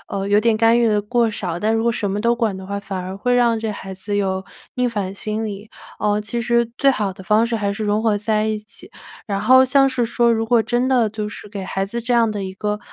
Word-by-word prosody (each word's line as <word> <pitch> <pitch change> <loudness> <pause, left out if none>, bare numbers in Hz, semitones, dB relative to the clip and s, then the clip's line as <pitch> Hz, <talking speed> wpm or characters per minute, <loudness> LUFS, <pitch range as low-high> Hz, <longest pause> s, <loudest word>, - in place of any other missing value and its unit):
呃， 195 0 -3
有 205 +1 +4
点 225 0 +2
干 225 +1 +4
预 240 - +3
得 210 -2 +2
过 235 +2 +1
少， 180 -5 -4
但 215 +4 +1
如 225 - +1
果 235 - +2
什 225 -3 -2
么 205 +2 -2
都 235 +2 +2
管 225 -5 0
的 190 - -8
话， 200 +1 -3
反 200 -1 -6
而 185 +1 -6
会 245 +5 0
让 240 -2 +3
这 220 0 -3
孩 190 -1 -8
子 200 +2 -5
有 190 -1 -1 0.3
逆 250 0 +1
反 205 -5 -3
心 215 +2 -3
理。 205 0 -7 0.3
呃， 210 0 +1
其 215 +3 -4
实 235 0 +1
最 275 - +5
好 210 -5 -2
的 190 0 -13
方 215 +3 +3
式 235 -1 -1
还 200 -2 -1
是 215 +2 -5
融 210 +1 +1
合 220 -2 +2
在 215 0 0
一 215 -1 -2
起。 210 -1 -13 0.4
然 200 -3 -2
后 260 +5 +6
像 270 +1 +4
是 260 -2 0
说 235 0 +2
如 225 0 0
果 230 -1 +3
真 240 +3 0
的 245 -4 +3
就 210 0 -4
是 210 - -9
给 200 -2 -6
孩 195 +1 -2
子 235 +4 -4
这 240 +1 -1
样 230 -2 +3
的 205 -2 -4
一 190 - -5
个， 210 +1 -2
215 Hz, 290 characters per minute, -20 LUFS, 200-235 Hz, 0.4 s, 后